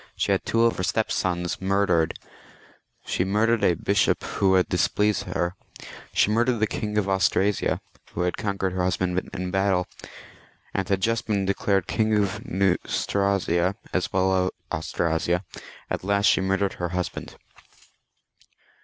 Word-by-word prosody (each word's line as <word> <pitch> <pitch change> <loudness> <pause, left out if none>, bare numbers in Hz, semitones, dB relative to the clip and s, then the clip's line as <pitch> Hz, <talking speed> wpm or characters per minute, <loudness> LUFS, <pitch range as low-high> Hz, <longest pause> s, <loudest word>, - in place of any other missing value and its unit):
She - - 0
had - - +1
two 115 0 +2
of 115 - +2
her 90 - -2
stepsons 90 -4 -1
murdered; 95 -4 +1 0.9
she - - 0
murdered 105 +3 +1
a 90 - +4
bishop 100 +3 +1
who 95 -1 +1
had 90 - +3
displeased 105 +3 +1
her; 85 0 -2 0.6
she 105 - +3
murdered 120 +2 +2
the 110 - +3
King 105 -1 -3
of 100 -2 +1
Austrasia, 95 +1 +1 0.3
who - - -1
had 90 0 0
conquered 100 -3 -2
her 90 -1 -1
husband 90 0 -1
in 90 0 -4
battle, 95 -1 +1 0.9
and 95 -1 -2
had 100 -1 +1
just 115 +1 0
been 100 -3 0
declared 100 -1 +1
King 110 -1 +1
of 105 +1 -1
Neustria, 95 -2 +1 0.2
as 95 - 0
well 95 0 +2
as 95 0 +2
of - - -2 0.3
Austrasia; 85 +3 -1 0.5
at - - -2
last 100 +1 +1
she 100 - +4
murdered 95 +1 0
her 90 -1 -3
husband. 90 0 -4
95 Hz, 150 wpm, -25 LUFS, 90-105 Hz, 0.9 s, a